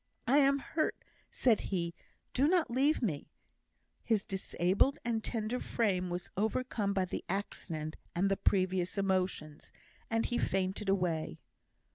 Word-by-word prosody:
"I 270 +4 +5
am 275 0 +5
hurt," 310 +3 -2 0.2
said 235 -4 +3
he; 170 -3 -1 0.4
"do 275 +3 +3
not 345 -5 +2
leave 275 +4 +2
me;" 155 -10 -2 0.7
his 220 -4 +1
disabled 190 +7 +1
and 225 -2 0
tender 230 +1 -2
frame 185 -6 0
was 175 0 -4
overcome 220 0 0
by 190 -2 +1
the 180 - -4
accident 160 -5 -4 0.2
and 185 +3 +2
the - - +4
previous 185 -1 +1
emotions, 185 -6 -1 0.4
and 225 0 +1
he 240 - 0
fainted 190 +2 0
away. 175 - 0
200 Hz, 135 wpm, -33 LUFS, 180-240 Hz, 0.7 s, I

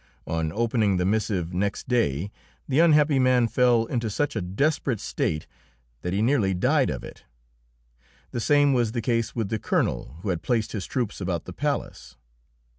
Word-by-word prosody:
On 80 -1 -2
opening 110 -2 +1
the 90 - 0
missive 100 -4 -1
next 100 +2 -2
day 100 - 0 0.4
the 135 +2 +1
unhappy 150 -4 +5
man 125 -2 +4
fell 120 -1 +3
into 115 -1 -2
such 145 +7 -1
a 105 - -1
desperate 130 - 0
state 75 -4 -2 0.6
that 90 - -3
he 100 +3 0
nearly 110 -7 +2
died 90 - +2
of - - -4
it. - - -11 1.1
The - - -3
same 145 +3 +4
was 120 -3 +1
the 120 - -1
case 115 -2 0
with 110 -5 -2
the 110 - -2
Colonel - - -1
who 105 - -2
had 85 -3 -1
placed 115 -3 0
his 100 -4 -4
troops 120 -6 -3
about 90 -3 -2
the - - -8
palace. - - -4
110 Hz, 175 wpm, -25 LUFS, 95-125 Hz, 1.1 s, unhappy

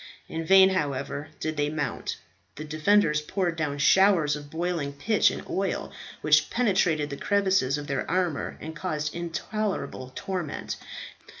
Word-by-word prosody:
In 165 0 -4
vain, 190 +2 +7
however, 145 -3 -2
did 155 -1 -3
they 145 0 +1
mount. 145 -4 -3 0.4
The 155 - -6
defenders 155 +1 +2
poured 175 +2 -1
down 150 -3 -2
showers 160 0 +4
of 145 -1 -9
boiling 165 -3 -2
pitch 205 +10 +3
and - - -6
oil, 195 -1 -2 0.3
which 150 0 +4
penetrated 180 -10 +1
the 140 - -4
crevices 190 -9 +2
of 145 - -5
their 135 -2 -2
armour, 175 -3 -1
and 160 +1 -7
caused 155 -2 -3
intolerable 175 -4 -3
torment. 180 -6 -4
155 Hz, 140 wpm, -27 LUFS, 145-190 Hz, 0.4 s, vain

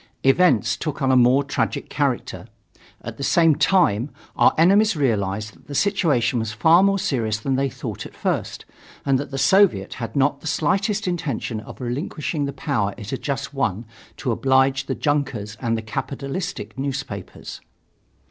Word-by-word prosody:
Events 135 - +3
took 150 -3 -4
on 130 - +3
a - - +4
more 125 +3 +5
tragic 145 - -2
character. - - -2 0.6
At - - -7
the 140 - -5
same 165 +2 +4
time, 145 - +2 0.3
our - - +5
enemies 200 +5 +4
realized 110 -6 -1
that - - -23
the 145 - -6
situation 150 - +1
was 110 -1 -3
far 160 +11 +5
more 195 0 +3
serious 120 - -1
than 135 +3 -1
they 135 +1 +1
thought - - -6
at - - -19
first - - -3 0.4
and 135 -2 +2
that 140 - -5
the 135 - -5
Soviet 175 - +3
had 115 - -5
not 140 0 +1
the - - -7
slightest 195 +7 0
intention 145 -10 -2
of 110 - -11
relinquishing 145 +4 -3
the 140 - -3
power 105 -10 -2
it 105 -3 -8
had 135 - -3 0.3
won 115 -6 -1
just 115 - -24
to - - -2
oblige 135 0 +2
the - - -2
junkers 135 -8 -1
and 115 -2 0
the 110 - -5
capitalistic 135 - -5
newspapers. 135 -8 -5
135 Hz, 165 wpm, -22 LUFS, 115-155 Hz, 0.6 s, more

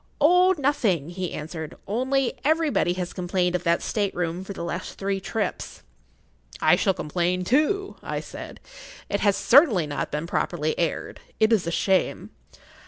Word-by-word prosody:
"Oh—nothing," 290 - +3
he 180 0 -4
answered; 160 0 -6
"only 260 +4 0
everybody 310 - +2
has 180 -1 -4
complained 180 -1 0
of 180 - 0
that 170 0 +2
state 205 -3 -1
room 175 +1 -2
for 190 - -8
the 180 - -6
last 170 +1 -5
three 195 0 -1
trips." 210 +3 -4 0.8
"I - - +5
shall 195 -2 +1
complain 180 +2 -1
too," 310 - +1
I - - -3
said. - - -9 0.5
"It 200 - 0
has 200 -1 +2
certainly 240 - +5
not 145 -1 -3
been 150 +2 -3
properly 160 -2 -1
aired. 170 -2 -2 0.2
It 220 +1 +4
is 190 -6 +1
a - - -1
shame!" 190 +2 0
190 Hz, 155 wpm, -25 LUFS, 175-255 Hz, 0.8 s, I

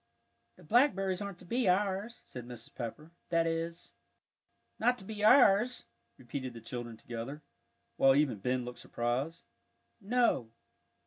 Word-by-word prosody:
"The - - -17
blackberries 195 -6 +3
aren't 200 -3 -5
to 180 - -14
be 235 +2 +1
ours," 200 +4 0
said 125 -2 -9
Mrs. 120 -2 -10
Pepper; 150 +7 -6 0.2
"that 165 -1 +2
is 165 - -3 0.4
" - - -47
"Not 245 +2 +3
to - - -9
be 210 +1 -6
ours," 240 0 +5 0.3
repeated 130 -1 -6
the - - -7
children 120 0 -6
together, 120 +7 -7 0.5
while 135 0 +6
even 140 -7 +2
Ben 125 +4 -1
looked 125 0 -8
surprised. 130 +8 -2 0.6
"No." 225 - +1
165 Hz, 140 wpm, -32 LUFS, 125-205 Hz, 0.6 s, while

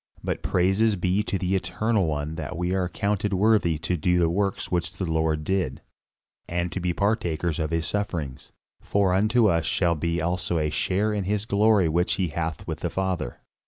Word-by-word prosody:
But - - -2
praises 95 +4 +2
be 90 +2 +1
to 105 -2 -2
the 95 +1 0
Eternal 95 +2 0
One 75 0 -2
that 80 +1 -5
we 90 +1 -1
are 95 -1 +1
accounted 100 +3 -1
worthy 100 -5 +3
to 85 +3 -1
do 90 +2 +1
the 85 -2 +3
works 100 +1 -1
which 85 -1 -1
the 90 +3 -3
Lord 80 -2 0
did, 95 -6 -1 0.7
and 85 0 -1
to - - -3
be 90 0 0
partakers 85 -5 0
of 80 -1 -1
his 80 0 -1
sufferings. 80 -9 -3 0.3
For 100 -2 +1
unto 110 +5 +3
us 85 -4 +2
shall 85 -2 +2
be 85 +2 -1
also 85 +1 -1
a 75 -1 0
share 95 +8 0
in 100 -2 -2
his 105 +1 -1
glory 105 -3 +3
which 85 +3 +1
he 95 -3 0
hath 80 0 -3
with - - -4
the - - -2
Father. 95 -8 -3
90 Hz, 195 wpm, -25 LUFS, 80-100 Hz, 0.7 s, worthy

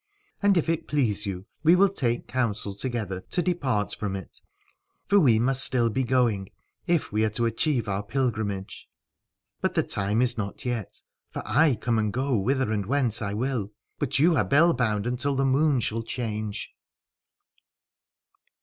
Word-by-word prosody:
And 200 -2 +4
if 165 - +1
it 165 -1 -1
please 110 -8 +1
y.ou, 95 -1 -5 0.2
we 160 +3 +6
will 195 +2 +5
take 125 -11 -2
counsel 115 -5 -2
together 105 -4 -3
to 180 - 0
depart 135 - 0
from 100 -2 -3
it: 95 -2 -9 0.6
for 200 +1 +4
we 125 - +5
must 130 +3 +1
still 120 -2 +1
be 130 +5 0
going 120 -6 +1 0.4
if 170 -3 +1
we 105 +1 +1
are 110 - +2
to 115 +3 -1
achieve 120 0 0
our 100 0 -1
pilgrimage. 105 -5 -3 0.7
But - - -1
the - - +3
time 105 +4 0
is 120 -2 +3
not 100 +5 -5
yet: 120 -5 -4 0.3
for - - -6
I 140 +5 +3
come 115 +1 0
and 105 -1 0
go 130 +2 0
whither 125 +3 0
and 105 -3 -1
whence 125 -4 +1
I 100 -1 -2
will, 115 -3 -2 0.3
but - - 0
you 160 +4 +4
are 125 - +3
bell 165 +5 +4
bound 110 -5 0
until 125 +3 -1
the 135 +1 +1
moon 140 +1 +3
shall 115 +2 -1
change. 110 -3 -4
120 Hz, 170 wpm, -26 LUFS, 105-135 Hz, 0.7 s, we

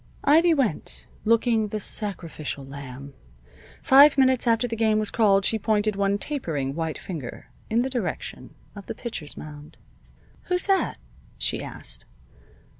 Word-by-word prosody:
Ivy 325 +4 +5
went, 245 - -1 0.2
looking 225 -1 +3
the 215 +1 -4
sacrificial 165 -9 -2
lamb. 140 0 -9 0.7
Five 280 +2 +7
minutes 260 -2 +3
after 230 +1 +3
the 230 - -3
game 220 -1 +2
was 215 -1 -1
called 200 -4 +3
she 220 - +1
pointed 215 0 +1
one 200 0 +1
tapering 160 - -3
white 160 0 -3
finger 155 -9 -8 0.2
in 230 +2 +2
the - - -1
direction 240 -8 -4 0.2
of 200 -2 -10
the - - -5
pitcher's 175 -11 -6
mound. 150 -1 -10 0.7
"Who's 360 0 0
that?" 390 -1 +1 0.4
she - - -1
asked. - - -5
215 Hz, 140 wpm, -25 LUFS, 160-245 Hz, 0.7 s, Five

